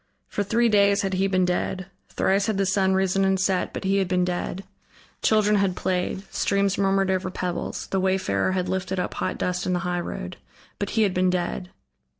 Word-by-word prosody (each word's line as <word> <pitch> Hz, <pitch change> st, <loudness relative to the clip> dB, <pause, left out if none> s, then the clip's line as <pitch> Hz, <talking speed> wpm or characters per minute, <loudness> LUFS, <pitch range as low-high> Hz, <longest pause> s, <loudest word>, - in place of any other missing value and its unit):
For -, -, -3 dB
three 230 Hz, +4 st, +2 dB
days 200 Hz, -1 st, +4 dB
had 195 Hz, -1 st, -1 dB
he 190 Hz, +1 st, +2 dB
been 185 Hz, -1 st, +2 dB
dead: 180 Hz, +1 st, -1 dB, 0.2 s
thrice 195 Hz, +3 st, +1 dB
had 215 Hz, -3 st, 0 dB
the 195 Hz, -, +2 dB
sun 190 Hz, 0 st, +2 dB
risen 190 Hz, 0 st, +2 dB
and 190 Hz, 0 st, +2 dB
set, 185 Hz, 0 st, +1 dB
but -, -, -6 dB
he 195 Hz, +1 st, +2 dB
had 195 Hz, -2 st, +1 dB
been 180 Hz, 0 st, +1 dB
dead; 180 Hz, +1 st, -3 dB, 0.6 s
children 210 Hz, -1 st, +3 dB
had 195 Hz, -2 st, +1 dB
played, 185 Hz, +1 st, -1 dB
streams 200 Hz, -1 st, +1 dB
murmured 195 Hz, -1 st, +2 dB
over 185 Hz, 0 st, -1 dB
pebbles, 180 Hz, -1 st, -4 dB
the 195 Hz, -, -1 dB
wayfarer 185 Hz, -, +1 dB
had 185 Hz, -1 st, -1 dB
lifted 190 Hz, 0 st, -2 dB
up -, -, -2 dB
hot -, -, -2 dB
dust 180 Hz, 0 st, -2 dB
in 185 Hz, -, +1 dB
the 180 Hz, -, +1 dB
highroad, 175 Hz, -, -4 dB, 0.4 s
but 200 Hz, -, -2 dB
he 220 Hz, -, +5 dB
had 195 Hz, -3 st, +1 dB
been 185 Hz, 0 st, +2 dB
dead. 180 Hz, 0 st, -2 dB
190 Hz, 200 wpm, -24 LUFS, 180-195 Hz, 0.6 s, he